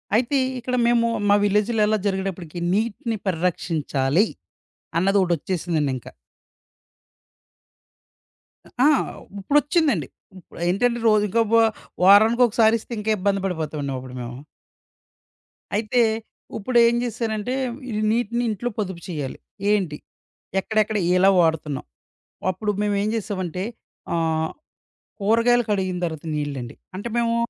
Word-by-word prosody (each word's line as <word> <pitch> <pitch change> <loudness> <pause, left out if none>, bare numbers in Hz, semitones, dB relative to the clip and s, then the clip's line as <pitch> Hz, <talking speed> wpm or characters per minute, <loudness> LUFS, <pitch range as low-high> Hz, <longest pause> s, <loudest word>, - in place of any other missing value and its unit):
అయితే 255 +5 +2 0.2
ఇక్కడ 250 +1 -2
మేము 235 -1 +3 0.2
మా 205 - +6
విలేజ్‌లో 210 +2 +2
ఎలా 215 - +2
జరిగేటప్పటికి 190 -4 -3
నీటిని 225 +1 -1
పరిరక్షించాలి. 165 -2 +1 0.7
అన్నదొకటి 190 -1 +3
ఒచ్చేసిందండి 160 -4 -1
ఇంకా. - - -11 2.7
ఆ! - - +7 0.5
ఉప్పుడొచ్చిందండి. 290 - +2 0.3
ఉప్ 180 - -17
ఏంటంటే 235 +6 +1
రోజుకో 215 +1 +3
బొ 230 - +7 0.4
వారానికొకసారిస్తే 220 +3 +5
ఇంకా 220 +1 -1
ఇబ్బంది 195 0 0
పడిపోతామండి 155 -6 -3
అప్పుడు 130 0 -9
మేము. 120 +1 -6 1.4
అయితే 220 +3 +2 0.6
ఉప్పుడేం 235 +2 +3
జేశానంటే 230 -1 -2 0.4
ఈ - - -4 0.2
నీటిని 235 +1 0
ఇంట్లో 220 +3 -2
పొదుపు 190 -4 -3
చేయాలి. 150 -7 -4 0.3
ఏంటి? 185 -8 0 0.6
ఎక్కడెక్కడ 215 +1 0 0.2
ఎలా 190 +2 +6
వాడుతున్నాం? 160 -4 0 0.7
అప్పుడు 210 +3 -2
మేమేం 205 0 0
జేసామంటే, 185 -5 -3 0.5
ఆహ్, 160 -1 0 0.7
కూరగాయలు 230 +3 +3
కడిగిన 185 -3 0
తర్వాత 160 -1 -5
నీళ్లండి. 140 -5 -4 0.2
అంటే 205 +5 -5
మేము 230 0 +1
200 Hz, 100 wpm, -23 LUFS, 170-230 Hz, 2.7 s, ఆ